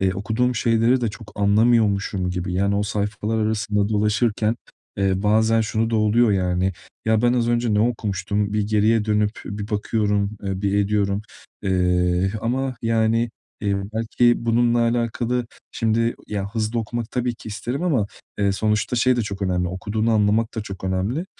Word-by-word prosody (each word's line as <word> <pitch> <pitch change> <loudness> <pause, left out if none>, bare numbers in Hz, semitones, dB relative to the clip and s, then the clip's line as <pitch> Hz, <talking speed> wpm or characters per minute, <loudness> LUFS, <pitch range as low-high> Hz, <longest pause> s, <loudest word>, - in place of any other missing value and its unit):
eee, 95 -1 +2
okuduğum 115 +5 0
şeyleri 115 +2 +2
de 120 - 0
çok 105 0 -12
anlamıyormuşum 100 -3 +2
gibi, 90 0 -3
yani 100 +2 +1
o 100 - +1
sayfalar 105 +1 -2
arasında 105 -2 0
dolaşırken, 105 +1 +1 0.4
eee, 95 -1 +1
bazen 110 +2 +3
şu 110 +1 0
da 115 - +1
oluyor 110 +1 +3
yani: 90 0 +1 0.3
"Ya, 110 0 +2
ben 120 0 +4
az 120 -2 +1
önce 120 -2 +1
ne 105 - +3
okumuştum?" 105 -3 -1
Bir 105 -1 +1
geriye 110 +1 +3
dönüp 105 0 0
bir 105 +1 -5
bakıyorum, 105 -1 0
eee, 95 0 -3
bir 100 0 +1
ediyorum. 100 0 +1 0.4
Eee, 90 0 +1
ama 130 +3 -1
yani, 115 0 +1 0.3
eee, 100 -1 0 0.2
belki 120 +2 +3
bununla 120 +1 +3
alakalı, 120 +1 0 0.3
şimdi, 115 +1 +1
ya 100 -2 -3
hızlı 110 +1 -1
okumak 115 0 -4
tabii 125 -1 -1
ki 110 - -11
isterim 120 - -4
ama, 135 - +1 0.3
eee, 100 -1 +2
sonuçta 105 +4 0
şey 125 +2 +3
de 120 - +1
çok 100 -1 -5
önemli, 90 -2 0
okuduğunu 105 +5 -2
anlamak 110 +1 +2
da 110 - -2
çok 95 -2 -8
önemli. 100 - -1
105 Hz, 165 wpm, -22 LUFS, 100-115 Hz, 0.4 s, ben